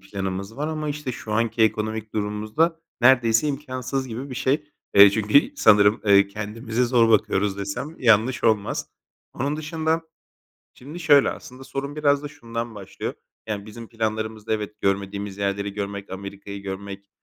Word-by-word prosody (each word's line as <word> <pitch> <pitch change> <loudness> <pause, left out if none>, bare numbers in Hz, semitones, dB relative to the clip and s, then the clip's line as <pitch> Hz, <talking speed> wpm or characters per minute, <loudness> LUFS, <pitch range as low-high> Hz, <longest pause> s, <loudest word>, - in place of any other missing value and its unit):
planımız 95 +2 -5
var 150 +2 -2
ama, 155 -1 -3
işte, 145 -3 -4
şu 110 -2 -7
anki 115 +1 +1
ekonomik 110 0 -1
durumumuzda, 110 +11 0 0.2
neredeyse 120 +1 +4
imkânsız 135 -2 -3
gibi 125 +4 -6
bir - - -5
şey. 135 +3 0 0.3
Eee, 100 0 +10
çünkü 110 - +3
sanırım, 105 - +5
eee, 100 -1 +6
"Kendimize 110 +3 -2
zor 120 -2 +4
bakıyoruz." 105 -2 +2
desem 100 +11 -5
yanlış 115 +1 +3
olmaz. 110 -3 +1 0.4
Onun 140 +4 -2
dışında, 160 +1 -1 0.7
şimdi 150 +7 -10
şöyle, 145 -4 +5
aslında 130 +1 -10
sorun 140 +2 -5
biraz 145 -1 +2
da 145 - -5
şundan 115 -5 -6
başlıyor. 100 -3 -6 0.3
Yani, 105 -2 -4
bizim 115 +1 -10
planlarımızda 110 -1 -3
evet, 105 -1 -3
görmediğimiz 100 0 -2
yerleri 100 0 -1
görmek, 100 -1 -5
Amerika'yı 100 +1 -7
görmek, 100 0 -7
110 Hz, 145 wpm, -24 LUFS, 100-135 Hz, 0.7 s, Eee